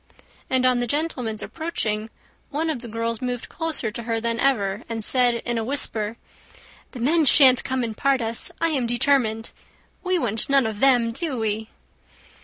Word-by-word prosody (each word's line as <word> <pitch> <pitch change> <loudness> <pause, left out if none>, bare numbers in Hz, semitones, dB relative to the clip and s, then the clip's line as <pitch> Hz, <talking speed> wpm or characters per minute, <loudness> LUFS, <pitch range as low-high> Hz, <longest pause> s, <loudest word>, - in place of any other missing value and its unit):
And 260 -1 +2
on 250 -1 +3
the 245 - -1
gentlemen's 250 -6 -2
approaching, 225 -10 -3 0.4
one 320 +2 -1
of 285 - -4
the 240 - -8
girls 230 0 -3
moved 245 -2 -4
closer 320 -9 -2
to 235 - -6
her 230 0 -2
than 230 0 -2
ever, 210 -6 +1
and 225 -1 -3
said, 245 +1 +3
in 240 -1 -1
a - - -2
whisper, 225 -4 -2 0.8
"The 255 - -8
men 315 +7 +2
shan't 260 -3 +7
come 260 -1 -2
and 225 -2 -4
part 275 +2 +1
us, 230 +7 -1
I 330 - +1
am 265 -6 -1
determined. 240 -3 +1 0.5
We 370 0 +1
want 225 -7 0
none 275 -2 +4
of 220 -2 -4
them; 245 -3 +4
do 280 +2 -4
we?" 220 0 -2
240 Hz, 180 wpm, -23 LUFS, 225-275 Hz, 0.8 s, shan't